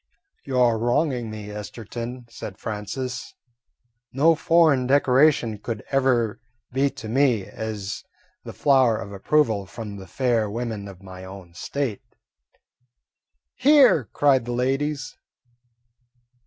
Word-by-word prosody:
"You 130 -2 -2
're 120 -3 +4
wronging 120 0 0
me, 105 -1 -7
Esterton," 115 +4 -7
said 110 -4 -8
Francis. 115 +4 -5 0.8
"No 155 +6 +4
foreign 155 -5 +3
decoration 130 -4 +3
could 110 0 -5
ever 130 -5 +2 0.3
be 135 +2 +2
to 110 - -9
me 120 -4 +2
as 105 -3 -5
much - - -45 0.3
as - - -56
the - - -8
flower 130 -5 +3
of 100 0 -7
approval 105 -1 +1
from 105 -1 -7
the 95 -1 -10
fair 115 0 0
women 110 -2 -4
of 95 -1 -12
my 95 -1 -10
own 95 -2 -11
State." 130 +2 -3 1.5
"Hear!" 265 - +5
cried 135 +3 +2
the 120 - -3
ladies. 135 +2 -1
120 Hz, 125 wpm, -24 LUFS, 105-135 Hz, 1.5 s, Hear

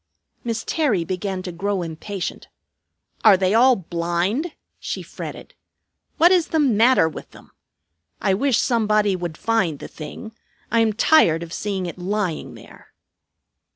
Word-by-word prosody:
Miss 230 -1 -3
Terry 245 - 0
began 185 0 -3
to 180 - -5
grow 195 +2 -2
impatient. 175 +4 -6 0.8
"Are 210 -4 +7
they 185 +1 +1
all 250 +3 +6
blind?" 175 - -2 0.3
she - - -5
fretted. - - -9 0.6
"What 345 +2 +6
is 355 -3 +3
the 320 - -1
matter 250 - +4
with 160 - -8
them? - - -17 0.7
I 195 -1 +1
wish 255 +5 +2
somebody 215 -4 +2
would 175 -3 -5
find 190 -10 0
the - - -8
thing. 220 +8 -9 0.4
I 230 - +3
am 225 -1 +3
tired 200 - +4
of 170 0 -9
seeing 200 -3 -3
it 175 +1 -7
lying 185 -2 -3
there." - - -16
205 Hz, 145 wpm, -22 LUFS, 175-230 Hz, 0.8 s, Are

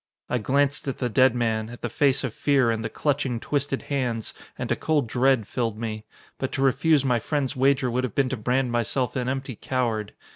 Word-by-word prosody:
I 125 - +1
glanced 140 +5 +1
at 135 - -2
the 125 - -1
dead 130 +2 +4
man, 110 -2 0
at 120 - -11
the - - 0
face 135 +4 +2
of 125 -5 -3
fear 135 -4 +2
and 110 -1 -2
the - - -2
clutching, 140 -5 -1
twisted 140 +1 -2
hands, 125 -6 -2 0.2
and - - -4
a - - +3
cold 150 -4 +1
dread 125 0 +2
filled 115 -1 -2
me. 110 -1 -5 0.3
But 130 - -2
to 135 - 0
refuse 140 +2 +3
my 125 -3 +2
friend's 140 +2 -1
wager 130 -1 +2
would 125 +2 0
have 130 - -3
been 135 -2 +2
to 130 - -2
brand 125 +3 0
myself 120 +2 0
an 125 -1 -1
empty 135 -1 -3
coward. 115 -4 -2
130 Hz, 215 wpm, -25 LUFS, 115-135 Hz, 0.3 s, dead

